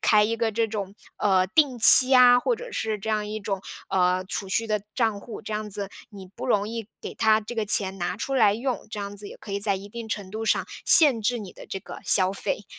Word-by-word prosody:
开 210 -1 +4
一 230 +2 -2
个 230 -1 -1
这 225 +1 0
种， 200 -2 -6 0.2
呃， 190 -2 +2
定 260 +2 +1
期 255 +3 +8
啊， 245 -1 +7
或 465 - -1
者 - - -10
是 220 -1 -3
这 220 +3 -5
样 210 -1 -1
一 215 - -5
种， 195 -1 -4 0.3
呃， 185 0 +1
储 195 +1 -5
蓄 225 +4 -1
的 210 -2 -2
账 220 -5 -1
户。 230 - -10
这 215 - -7
样 210 0 -4
子 200 0 -1 0.2
你 195 -2 -11
不 195 - -9
容 210 -3 0
易 225 -2 -6
给 - - -8
它 220 0 +2
这 225 +3 -8
个 220 -2 -2
钱 195 -2 +2
拿 175 +1 -3
出 270 +4 -4
来 210 -5 +4
用， 250 +1 -4
这 210 - -6
样 200 0 -7
子 205 0 -7
也 - - -12
可 200 - -10
以 200 - -3
在 200 -1 +1
一 195 +2 -10
定 230 +1 -8
程 200 -3 -5
度 220 +1 -5
上 - - 0 0.2
限 285 -9 +6
制 240 +3 0
你 200 -5 -9
的 - - -13
这 195 - -5
个 - - -11
消 185 -1 +4
费。 200 - -4
210 Hz, 270 characters per minute, -24 LUFS, 200-230 Hz, 0.3 s, 期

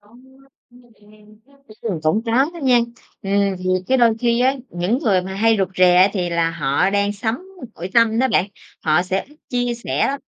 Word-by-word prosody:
Ừm, 215 +4 -21 1.8
cũng 160 +8 +1
có 225 - -2
đó 270 +6 +3
nha. 250 -3 +4 0.4
Ừm, 200 -1 0
thì 185 - -9 0.2
cái 265 - +2
đôi 235 -2 +4
khi 235 0 +1
á, 260 +2 +3 0.2
những 180 +8 -1
người 200 - +1
mà 190 +1 -6
hay 225 +2 +2
rụt 195 - +1
rè 180 -1 +5
á 185 +2 +6
thì 180 -4 -2
là 170 -1 +1
họ 150 +1 0
đang 200 0 0
sống 220 +3 -2 0.4
nội 180 +3 -7
tâm 230 -1 +3
đó 260 +1 +2
bạn, 190 - +2 0.4
họ 155 +2 +3
sẽ 190 +1 -2
ít 295 - -20
chia 245 -1 -1
sẻ 235 - -1
lắm, 275 +1 -3
205 Hz, 190 wpm, -20 LUFS, 185-240 Hz, 1.8 s, á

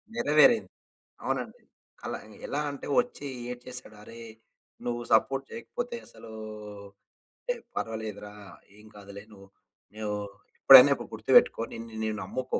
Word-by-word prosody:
నెరవేరింది. 155 - +4 0.6
అవునండి. - - -3 0.4
అలా - - -4 0.3
ఎలా - - -2
అంటే, 140 - -8
వచ్చి 245 -12 -6 0.2
ఏడ్చేసాడు. 125 -2 -9
"అరే! 115 +2 -12 0.6
నువ్వు 120 0 -2
సపోర్ట్ 135 +4 +3
చేయకపోతే 240 +1 -5
అసలూ" 115 - -14 1.2
టె - - +3 0.2
పర్వాలేదు 110 -2 -4
రా 105 - -10 0.5
ఏం 105 - -17
కాదులే. 100 0 -11
నువ్వు, 100 -1 -15 0.5
నువ్వు 105 -1 -3 0.4
ఎప్పుడైనొకటి - - +8
గుర్తుపెట్టుకో - - +4
నిన్ను 115 0 -9
నీ 110 - 0
నమ్ముకో 130 +7 -3
115 Hz, 115 wpm, -28 LUFS, 110-140 Hz, 1.2 s, ఎప్పుడైనొకటి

